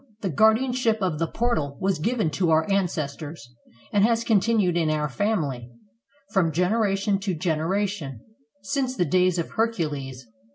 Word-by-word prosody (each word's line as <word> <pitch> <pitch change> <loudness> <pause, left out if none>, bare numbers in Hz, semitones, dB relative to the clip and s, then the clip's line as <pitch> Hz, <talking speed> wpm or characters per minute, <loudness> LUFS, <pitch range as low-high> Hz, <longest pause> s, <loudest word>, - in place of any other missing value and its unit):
"The 195 - -1
guardianship 225 - +3
of 180 -6 -1
the 165 - 0
portal 160 - -1
was 190 -4 0
given 220 -1 0
to 170 +3 0
our 160 0 +3
ancestors, 155 -8 -3 0.4
and 200 -1 +4
has 230 +1 +2
continued 210 -4 +2
in 165 -2 +1
our 150 -1 0
family, 145 - -2 0.6
from 185 -6 +2
gener 195 +6 +1
ation 195 0 0
to 195 -2 -2
generation, 165 - -2 0.4
since 260 +5 -1
the 180 - +1
days 180 +2 +2
of 170 - -3
Hercules. 150 - -2
185 Hz, 150 wpm, -25 LUFS, 155-215 Hz, 0.6 s, and